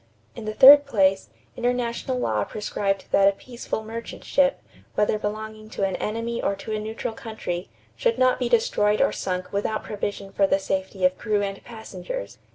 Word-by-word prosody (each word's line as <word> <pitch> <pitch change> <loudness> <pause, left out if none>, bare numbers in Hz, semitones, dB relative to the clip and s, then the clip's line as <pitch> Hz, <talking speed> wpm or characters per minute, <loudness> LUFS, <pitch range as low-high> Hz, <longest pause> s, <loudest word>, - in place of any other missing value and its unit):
In 230 - -8
the 215 - -3
third 280 +3 +9
place, 195 -6 +2 0.3
international 245 +1 -1
law 110 - 0
prescribed 200 - -2
that 195 - +5
a 200 - +4
peaceful 235 0 -6
merchant 230 +1 -7
ship, 275 -1 +2 0.4
whether 210 0 +2
belonging 215 +1 -5
to - - 0
an 190 -1 0
enemy 230 +2 -3
or 200 - 0
to 195 +3 -8
a - - -2
neutral 220 +1 -4
country, 215 -6 -5 0.3
should 475 -1 +1
not 255 0 +3
be 245 -2 0
destroyed 215 -3 +2
or - - +3
sunk 185 0 -4
without 210 +2 -1
provision 200 -1 -4
for 195 0 +2
the 195 - +3
safety 190 -1 -2
of 185 0 +2
crew 210 -1 0
and 195 0 -5
passengers. - - -7
215 Hz, 175 wpm, -24 LUFS, 195-235 Hz, 0.4 s, third